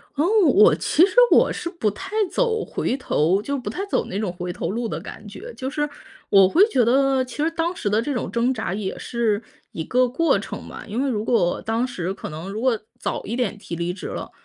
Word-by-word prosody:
哦， 295 +3 +2 0.2
我 415 +9 +6
其 345 - +4
实 390 - -5 0.2
我 - - +5
是 340 - -4
不 280 - -1
太 205 - -8 0.2
走 450 -3 +1
回 260 - -2
头 185 - +1
就 280 +5 -2
不 240 -5 -5
太 385 - -4
走 - - 0
那 190 - -5
种 205 -5 -1
回 180 0 -5
头 - - -4
路 230 +1 -2
的 - - -4
感 210 - -10
觉。 440 - -9
就 260 +1 -4
是 295 0 -1 0.4
我 195 -1 +6
会 375 - +6
觉 250 - +3
得 265 +2 +3
其 255 +2 -10
实 325 - +1
当 335 +2 -1
时 205 - -2
的 215 +2 +2
这 285 +5 -2
种 245 - -3
挣 235 +2 +1
扎 190 - -3
也 195 -2 -4
是 230 -3 -1 0.3
一 160 - -4
个 250 +7 +2
过 330 +7 +2
程 - - -7
吧。 - - -9
因 230 +6 -2
为 280 - 0
如 215 -3 -1
果 205 -8 +1
当 225 +3 0
时 185 -6 -3
可 - - -7
能 160 +5 -7
如 215 - -4
果 250 -4 +2 0.2
早 - - -3
一 230 - -3
点 245 -4 -1
提 175 - -7
离 170 +1 -2
职 185 - -7
了， - - -6
235 Hz, 255 characters per minute, -23 LUFS, 205-280 Hz, 0.4 s, 我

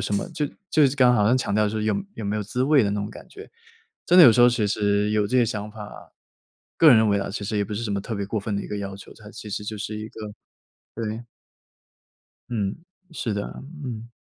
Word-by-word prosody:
什 - - -3
么， 100 - -1
就 155 -3 -2 0.3
就 155 - +4
是 135 - -5
刚 130 -2 +5
刚 125 - +4
好 105 - +3
像 125 +4 +3
强 110 - -2
调 105 0 +3
就 - - 0
是 110 - -4
说 110 - -2
有 200 - -3
有 110 - -5
没 100 +1 -1
有 105 - -1
滋 125 +5 -2
味 145 -3 +4
的 100 - 0
那 105 - -2
种 100 - -4
感 - - -12
觉。 415 +2 -12 0.6
真 180 - +4
的 - - +11
有 120 - +9
时 120 - +1
候 120 - +8
其 120 -3 0
实 105 0 +1
有 105 -1 +2
这 130 - +1
个 - - +4
想 105 -1 -4
法， 105 -1 -11 0.7
个 160 - +7
人 120 - +8
认 110 -1 +3
为 100 0 +2
啊， 100 - -4
其 100 - -5
实 105 +1 -2
也 100 - +1
不 105 - -6
是 105 +3 -3
什 115 - -3
么 100 - -1
特 115 +4 -6
别 100 - -3
过 105 +2 -2
分 100 +1 -3
的 100 - -2
一 - - -8
个 105 - -4
要 100 -1 -5
求， 100 - -13
它 105 -1 -13
其 105 - -9
实 105 +1 -4
就 110 +1 -5
是 105 +1 -4
一 110 0 -6
个 110 -2 -8 0.6
对。 115 +1 -5 1.2
嗯， 105 -4 -2 0.4
是 120 -9 -3
的， 100 0 -2 0.4
嗯。 120 -2 -6
110 Hz, 295 characters per minute, -24 LUFS, 105-120 Hz, 1.2 s, 的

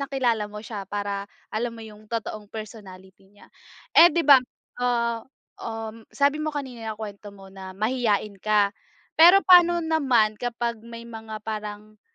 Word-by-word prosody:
nakilala 250 -7 -1
mo 210 +1 -9
siya 205 -3 -7
para 200 0 -4 0.2
alam 230 +1 -3
mo 225 - -9
yung 215 0 -14
totoong 215 -2 -5
personality 195 -3 -11
niya. 205 0 -21 0.4
Eh, 345 - +9
'di 340 0 -1
ba 275 -2 +8 0.4
ah, 235 -2 0 0.4
um, 225 0 -7
sabi 285 +2 +1
mo 310 - -2
kanina 260 -6 -6
nakwento 205 -1 -8
mo 195 -1 -14
na 190 -1 -10
mahiyain 215 -3 -1
ka. 210 -1 +2 0.4
Pero 355 +5 +7
paano 345 -2 +6
naman 250 -10 +2
kapag 235 -1 -3
may 230 +1 -10
mga 220 -2 -8
parang 215 -1 -7
220 Hz, 150 wpm, -24 LUFS, 210-245 Hz, 0.4 s, Eh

